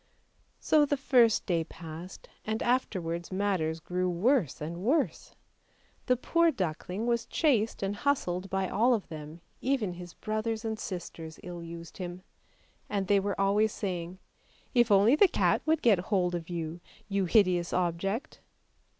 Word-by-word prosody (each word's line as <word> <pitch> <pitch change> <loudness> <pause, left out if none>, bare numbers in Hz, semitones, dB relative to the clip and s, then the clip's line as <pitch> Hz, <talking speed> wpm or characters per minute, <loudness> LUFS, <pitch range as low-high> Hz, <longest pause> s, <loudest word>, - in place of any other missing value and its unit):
So 305 -1 +4
the 285 0 +1
first 245 -5 +4
day 170 -3 +1
passed, 165 +2 -10 0.2
and 220 +1 -2
afterwards 180 -9 -1
matters 185 -5 0
grew 180 +2 -1
worse 185 - +1
and 160 +3 -5
worse. 265 - 0 0.7
The 250 - +3
poor 335 +6 +3
duckling 185 - -3
was 235 -1 0
chased 230 -10 +1
and 195 +1 -1
hustled 195 -9 0
by 190 0 0
all 235 +7 +3
of 210 - -5
them, 155 +1 -8 0.2
even 245 -8 0
his 175 0 -10
brothers 215 +1 -3
and 220 -1 -2
sisters 165 -3 -6
ill 175 -1 -7
used 170 0 -9
him; 180 0 -6 0.7
and 200 -2 -1
they 200 +1 +4
were 200 0 -2
always 205 +2 +3
saying, 180 -2 -4 0.3
" - - -33
If 240 -2 +4
only 205 +6 +6
the 390 +6 +6
cat - - +2
would 320 -1 +2
get 215 -6 +5
hold 180 -1 0
of 170 -1 -4
you, 170 0 -4 0.3
you 200 -2 0
hideous 180 -3 +3
object"! 190 - -2
195 Hz, 155 wpm, -29 LUFS, 175-225 Hz, 0.7 s, only